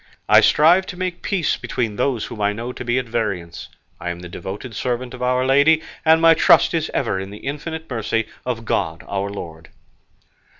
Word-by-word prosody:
I - - +7
strive 175 +5 +5
to 180 - -7
make 185 -1 -3
peace 180 -7 0
between 115 -4 -3
those 125 -1 0
whom 105 - -8
I 100 0 +2
know 120 +4 -5
to - - -7
be 120 +1 0
at 130 - -1
variance; 100 -8 -4 0.3
I 90 - -4
am 85 0 -5
the 90 - -8
devoted 100 +7 -7
servant 125 +1 -3
of 125 - -9
Our 125 +1 +1
Lady, 145 +4 +4 0.2
and 160 0 +5
my 165 0 +7
trust - - +5
is 160 -2 -1
ever 115 -8 -1
in 95 +1 -6
the 105 - -9
infinite 160 +3 -5
mercy 115 -2 -1 0.2
of 115 -3 -4
God 80 -6 -1
our 100 0 -2
Lord." 80 -5 -8
125 Hz, 200 wpm, -21 LUFS, 100-150 Hz, 0.3 s, I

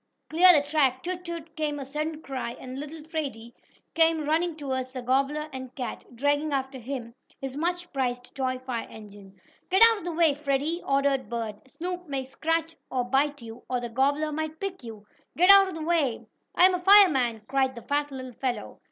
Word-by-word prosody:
Clear 360 +3 +8
the 285 - -6
track! 265 -5 +2
Toot! 360 0 -3
Toot!" 335 -2 -7
came 300 -2 -2
a 275 - -5
sudden 305 +3 -4
cry 255 -3 -5
and 260 +1 -7
little 300 +2 -7
Freddie 275 -8 -5 0.4
came 325 -1 +3
running 325 +2 +1
toward 265 -4 -3
the 255 -1 -7
gobbler 275 +4 0
and 260 -1 -8
cat, 255 -3 -5
dragging 290 +4 +1
after 265 -1 -2
him 240 -1 -6 0.3
his 270 -1 -6
much 350 +2 -2
prized 245 -2 -2
toy 260 -2 -1
fire 255 -2 -5
engine. 200 -2 -13 0.3
"Get 380 +2 +3
back 460 - +11
out 450 - -1
of 350 - -11
the 350 - -3
way, 325 -2 +4
Freddie!" 290 +4 -1
ordered 275 -1 +1
Bert. 230 +1 -5
"Snoop 360 +1 -4
may 275 -2 -2
scratch 325 +5 -2
or 255 -1 -1
bite 275 +2 0
you, 225 +1 -10
or 250 -1 0
the 240 0 -5
gobbler 285 +5 +1
may 315 +1 -2
pick 370 +1 -6
you. 220 -3 -10 0.3
Get 360 +4 +7
out 395 -1 +8
of 375 - -6
the 320 - -5
way!" 310 -8 0 0.3
"I'm 370 +1 +6
a 360 - -2
fireman!" 290 - +6
cried 265 -1 +1
the 235 - -9
fat 290 0 -1
little 260 -2 -7
fellow. 255 0 -4
280 Hz, 195 wpm, -26 LUFS, 255-320 Hz, 0.4 s, back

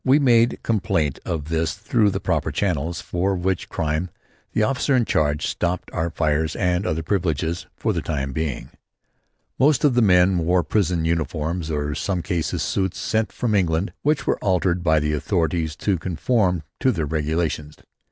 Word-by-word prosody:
We 135 +2 +5
made 120 -4 +4
complaint 85 - 0
of 80 -3 -3
this 80 +2 0
through 105 +2 +2
the - - -2
proper - - -1
channels, 85 -4 -1
for 95 +3 -1
which 95 0 -2
crime 80 +3 -1 0.4
the 110 - +1
officer 135 +3 +1
in 120 -3 +3
charge 75 -4 +1
stopped 90 +1 -2
our 85 0 -1
fires 80 -1 0
and 90 +1 0
other 80 +1 -1
privileges 85 -2 -1
for - - 0
the - - -1
time 70 -3 -3
being. 75 -3 -3 0.9
Most 145 0 +4
of 145 -4 +4
the 120 - +3
men 90 -3 +4
wore 90 +2 +2
prison 90 -5 0
uniforms 80 +1 -1
or 75 -1 -1
in - - -2
some 90 +2 -2
cases, 85 -3 -1
suits 95 -2 -1
sent 110 0 -1
from 120 -3 -1
England 90 -1 +1
which 145 -3 +1
were - - 0
altered 90 -2 +1
by 80 -2 +4
the 75 +1 -1
authorities 80 -1 0
to 95 +1 0
conform 90 +1 0 0.2
to 130 - +3
their 80 -9 -1
regulations. 75 0 -2
85 Hz, 170 wpm, -22 LUFS, 80-100 Hz, 0.9 s, We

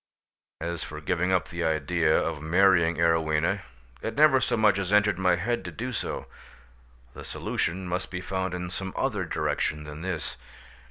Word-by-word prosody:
As 85 0 -3
for 75 +1 -7
giving 90 +3 0
up 90 -1 +1
the 85 0 -3
idea 80 +1 +2
of 75 - -1
marrying 85 0 +4
Arowhena, 80 +2 +2 0.4
it 115 - -4
never 140 -2 +6
so - - +1
much 105 -3 +4
as 95 0 -2
entered 105 -2 +4
my 90 -1 +4
head 120 +8 -1
to - - -5
do 125 +3 -4
so: - - -3 0.9
the - - -9
solution 90 +2 -2
must 90 +1 -2
be 90 - -4
found 95 0 -2
in 90 0 -5
some 95 0 -5
other - - 0
direction 75 0 -1
than 75 +1 -8
this. 80 -5 -4
90 Hz, 170 wpm, -27 LUFS, 80-95 Hz, 0.9 s, never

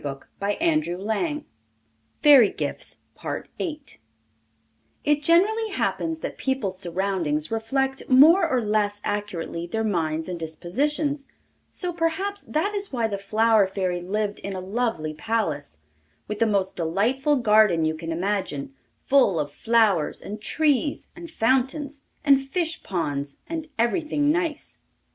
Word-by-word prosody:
By 145 +9 -4
the 335 - 0
Comte 310 -2 +3
de 175 - -3
Caylus. 290 - -2 0.8
FAIRY 275 -8 +8
GIFTS - - -3 2.0
It 295 0 +2
generally 405 +8 +3
happens 325 -4 -1
that - - -5
people's 235 -9 -1
surroundings 175 -4 -1
reflect 265 +4 -1
more 320 +7 +7
or 255 -3 +1
less 210 -1 0
accurately 185 -5 -3
their 220 +5 -2
minds 160 -6 -1
and 180 -2 -4
dispositions, 275 - -2 0.4
so 360 -2 -4
perhaps 345 +5 -1
that 380 +8 -1
is 400 -1 -2
why 240 -4 0
the 200 -3 -2
Flower 215 +1 +3
Fairy 185 -2 -2
lived 205 +3 -2
in 200 -1 -5
a - - -3
lovely 190 -5 -2
palace, 155 - -2 0.5
with 210 0 -4
the 230 - +3
most 200 -3 0
delightful 225 - +1
garden 215 - +4
you 155 - +1
can 165 +1 -6
imagine, 175 -6 -2 0.3
full 255 - +4
of 145 -1 -2
flowers, 220 -6 +2
and 210 +1 -7
trees, 295 +3 +1
and 340 -1 -9
fountains, 270 +2 0 0.2
and 275 -2 +6
fish 325 +4 -2
ponds, 145 -6 -3
and 320 -1 -5
everything 295 +5 +1
nice. 330 -2 -2
220 Hz, 135 wpm, -24 LUFS, 185-295 Hz, 2.0 s, FAIRY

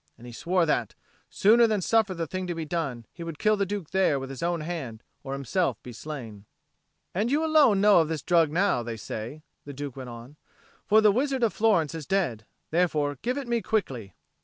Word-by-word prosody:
And 120 - -14
he 120 - -9
swore 175 +7 +1
that, 120 -8 -1 0.3
sooner 230 +3 +5
than 215 -2 +1
suffer 215 0 +2
the 165 -1 -2
thing 185 +3 -4
to 175 - -3
be 165 -1 -4
done, 145 -8 -3
he 170 - -8
would 165 -2 -6
kill 215 +4 +3
the 200 -1 -1
Duke 200 -5 -5
there 185 -7 +2
with 135 0 -6
his 135 - -8
own 170 -1 -1
hand 150 -9 -5 0.2
or 135 -1 -5
himself 140 +7 -1
be 125 - -9
slain. 115 -6 -8 0.7
"And 210 +6 0
you 300 +4 +1
alone 295 -11 +5
know 205 -3 +6
of 160 - +2
this 160 -1 -4
drug 165 -3 +3
now, 180 -5 +2
they 115 -1 -5
say," 115 +8 -7 0.2
the 145 - -8
Duke 140 -1 -6
went 130 -2 -7
on. 120 +5 -11 0.5
"For 215 +1 +6
the 210 -1 +6
wizard 265 +3 0
of 220 -5 +2
Florence 190 -9 +2
is 160 -4 -7
dead. 130 - -1 0.2
Therefore 150 -5 +1
give 250 +3 -1
it 275 -3 -4
me 235 -1 0
quickly." 135 - -2
165 Hz, 215 wpm, -27 LUFS, 135-205 Hz, 0.7 s, know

